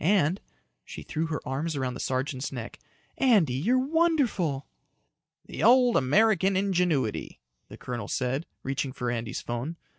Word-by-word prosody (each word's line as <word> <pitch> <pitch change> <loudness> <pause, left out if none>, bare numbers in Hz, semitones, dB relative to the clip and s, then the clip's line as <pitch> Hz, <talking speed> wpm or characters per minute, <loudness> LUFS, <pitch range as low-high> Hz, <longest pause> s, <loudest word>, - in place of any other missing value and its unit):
And" 185 0 +2 0.4
she - - -9
threw 160 0 -2
her 155 -2 -4
arms 145 +5 -2
around 130 -2 -2
the 125 - -8
sergeant's 130 +1 -2
neck 120 -3 -7 0.4
"Andy, 210 - +4
you're 195 - +2
wonderful." 260 - +1 0.8
"The - - -7
old 250 -1 +5
American 195 +6 +3
ingenuity," 175 - 0 0.3
the - - -10
colonel 120 -5 -5
said, 130 +5 -2 0.2
reaching 135 0 -2
for 125 -2 -2
Andy's 115 0 -3
phone. 120 +8 -4
150 Hz, 140 wpm, -27 LUFS, 130-200 Hz, 0.8 s, old